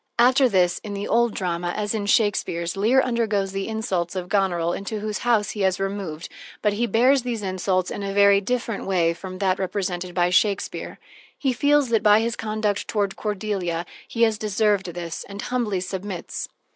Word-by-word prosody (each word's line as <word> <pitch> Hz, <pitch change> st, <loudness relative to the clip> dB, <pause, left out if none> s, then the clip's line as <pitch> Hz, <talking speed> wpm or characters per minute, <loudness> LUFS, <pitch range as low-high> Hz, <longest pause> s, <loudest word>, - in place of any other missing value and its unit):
After 255 Hz, +2 st, +5 dB
this, 180 Hz, -3 st, +2 dB
in 205 Hz, -2 st, -6 dB
the 200 Hz, +1 st, -4 dB
old 235 Hz, 0 st, +2 dB
drama, 175 Hz, -1 st, -2 dB
as 210 Hz, 0 st, -1 dB
in 205 Hz, -2 st, -2 dB
Shakespeare's, 195 Hz, -5 st, +1 dB
Leir 225 Hz, +7 st, +4 dB
undergoes 220 Hz, -5 st, 0 dB
the 195 Hz, 0 st, -3 dB
insults 195 Hz, -6 st, -2 dB
of 180 Hz, -1 st, -4 dB
Goneril, 175 Hz, -4 st, +1 dB
into 210 Hz, +2 st, -4 dB
whose 210 Hz, 0 st, -3 dB
house 225 Hz, -4 st, +2 dB
he 210 Hz, -, -5 dB
has 190 Hz, -2 st, +2 dB
removed, 195 Hz, -5 st, -4 dB, 0.4 s
but 210 Hz, -1 st, +3 dB
he 235 Hz, +4 st, 0 dB
bears 255 Hz, +4 st, +4 dB
these 235 Hz, -3 st, -3 dB
insults 185 Hz, -1 st, -1 dB
in -, -, -4 dB
a 200 Hz, 0 st, -3 dB
very 200 Hz, 0 st, +5 dB
different 230 Hz, -1 st, -2 dB
way 170 Hz, -3 st, +2 dB
from 185 Hz, +2 st, -8 dB
that 190 Hz, -1 st, +1 dB
represented 185 Hz, -2 st, -3 dB
by 175 Hz, -1 st, +2 dB
Shakespeare: 200 Hz, +2 st, 0 dB, 0.4 s
he 265 Hz, -3 st, 0 dB
feels 285 Hz, +1 st, +3 dB
that 225 Hz, -2 st, +2 dB
by 210 Hz, 0 st, +6 dB
his 230 Hz, +1 st, -1 dB
conduct 215 Hz, -2 st, -2 dB
toward 200 Hz, -2 st, -1 dB
Cordelia, 195 Hz, -5 st, -2 dB, 0.2 s
he 235 Hz, -, 0 dB
has 220 Hz, -2 st, +2 dB
deserved 210 Hz, -2 st, +1 dB
this, 170 Hz, -2 st, -5 dB
and 200 Hz, 0 st, -8 dB
humbly 225 Hz, -5 st, -1 dB
submits. 185 Hz, 0 st, -5 dB
200 Hz, 185 wpm, -23 LUFS, 185-220 Hz, 0.4 s, by